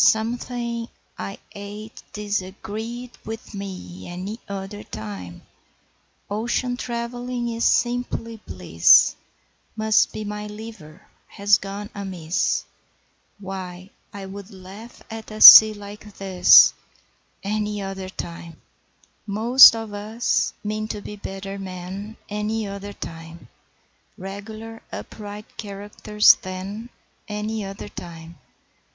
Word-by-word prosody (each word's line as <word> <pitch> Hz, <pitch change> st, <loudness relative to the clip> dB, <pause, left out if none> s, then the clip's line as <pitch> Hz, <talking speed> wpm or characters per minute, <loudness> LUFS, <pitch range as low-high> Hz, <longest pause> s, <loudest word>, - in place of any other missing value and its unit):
'Something.. 235 Hz, +1 st, 0 dB, 0.3 s
I 100 Hz, 0 st, -6 dB
ate.. 205 Hz, +2 st, -9 dB
disagreed.. 210 Hz, +4 st, -5 dB
with 225 Hz, +1 st, -8 dB
me! 185 Hz, -, -7 dB
Any 190 Hz, +6 st, -6 dB
other 200 Hz, +1 st, -6 dB
time 100 Hz, -, -8 dB, 0.8 s
Ocean 240 Hz, +4 st, -1 dB
trav'lling 240 Hz, 0 st, -4 dB
is.. 230 Hz, -, 0 dB
simply 240 Hz, -2 st, 0 dB
bliss, 85 Hz, -2 st, +5 dB, 0.6 s
Must 220 Hz, 0 st, +3 dB
be 215 Hz, -, -5 dB
my.. 210 Hz, 0 st, -5 dB
liver.. 210 Hz, -7 st, -10 dB, 0.2 s
has 205 Hz, 0 st, +3 dB
gone 200 Hz, +1 st, -7 dB
amiss.. 185 Hz, -4 st, -1 dB, 0.7 s
Why, 185 Hz, -1 st, -8 dB, 0.2 s
I 200 Hz, -1 st, -8 dB
would.. 195 Hz, +1 st, -9 dB
laugh.. 195 Hz, +4 st, -12 dB
at 225 Hz, 0 st, -7 dB
a 215 Hz, 0 st, -8 dB
sea.. 220 Hz, 0 st, +13 dB
like 205 Hz, 0 st, -11 dB
this 185 Hz, -2 st, +7 dB, 0.7 s
Any 210 Hz, 0 st, -2 dB
other 195 Hz, -1 st, -5 dB
time.'..... 170 Hz, -3 st, -8 dB, 0.7 s
Most 230 Hz, +5 st, +8 dB
of 225 Hz, -2 st, -6 dB
us 215 Hz, +3 st, 0 dB
mean 215 Hz, +1 st, -3 dB
to 210 Hz, -, -5 dB
be 210 Hz, -, -8 dB
better 195 Hz, 0 st, -7 dB
men 190 Hz, +3 st, -7 dB
Any 210 Hz, +1 st, -2 dB
other 200 Hz, 0 st, -7 dB
time: 165 Hz, -2 st, -9 dB, 0.7 s
Regular 215 Hz, +4 st, -8 dB
upright 210 Hz, 0 st, -9 dB
characters 210 Hz, +1 st, +3 dB
then 195 Hz, +5 st, -6 dB, 0.4 s
Any 210 Hz, 0 st, -3 dB
other 195 Hz, +1 st, -7 dB
time. 165 Hz, -4 st, -10 dB
205 Hz, 105 wpm, -23 LUFS, 190-220 Hz, 0.8 s, sea